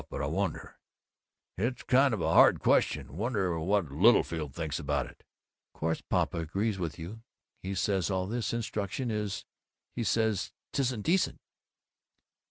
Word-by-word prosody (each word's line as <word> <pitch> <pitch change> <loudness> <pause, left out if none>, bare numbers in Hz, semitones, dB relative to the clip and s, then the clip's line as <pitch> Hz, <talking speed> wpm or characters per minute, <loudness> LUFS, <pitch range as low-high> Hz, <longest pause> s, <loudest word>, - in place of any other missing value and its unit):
But - - -4
I - - +1
wonder - - -3 0.8
It's 120 +5 -1
kind 135 +1 +4
of 110 -6 -1
a - - +1
hard - - +7
question. 70 - +1
Wonder 100 -6 0
what 90 -2 0
Littlefield 80 - +3
thinks 80 -3 -3
about 70 -2 -1
it?" 60 - -15 0.5
"Course 80 +1 -1
Papa - - 0
agrees 95 +6 -1
with 85 -3 -3
you. 90 +7 -8 0.4
He 95 +1 -4
says 95 -2 0
all 95 -1 0
this 115 +4 -2
Instruction 115 +1 -2
is 105 -2 -3 0.5
He 120 - -1
says 110 -3 0 0.2
'tisn't 125 -6 0
decent." 185 +3 +1
100 Hz, 145 wpm, -30 LUFS, 85-115 Hz, 0.8 s, hard